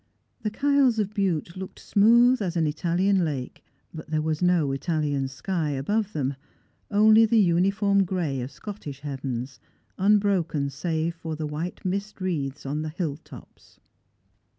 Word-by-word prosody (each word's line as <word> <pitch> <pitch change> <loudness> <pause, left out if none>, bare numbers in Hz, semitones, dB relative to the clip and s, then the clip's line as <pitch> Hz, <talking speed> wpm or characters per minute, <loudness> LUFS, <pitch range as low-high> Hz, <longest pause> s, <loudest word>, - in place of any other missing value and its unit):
The 215 - -1
Kyles 275 0 +2
of 210 -1 -1
Bute 175 -5 -1
looked 190 0 -8
smooth 235 +4 +4
as 180 -3 -2
an 165 - +2
Italian 175 +5 +1
lake, 140 -6 -4 0.3
but 155 -1 -9
there 155 0 0
was 155 0 -1
no 175 -6 +3
Italian 145 -2 -1
sky 155 +4 -2
above 200 +10 -1
them, 140 -3 -1 0.6
only 215 +2 +6
the 230 - +3
uniform 195 +2 +3
gray 170 -8 -2
of 125 - -5
Scottish 145 -1 -8
heavens, 135 -2 -5 0.4
unbroken 190 -8 +2
save 160 +3 -2
by 160 -1 -4
the 155 0 -4
white 155 +6 -5
mist 200 +3 -3
wreaths 145 -7 -3
on 145 +3 -2
the 155 - -3
hill 155 -3 -3
tops. - - -16
170 Hz, 150 wpm, -25 LUFS, 145-200 Hz, 0.6 s, only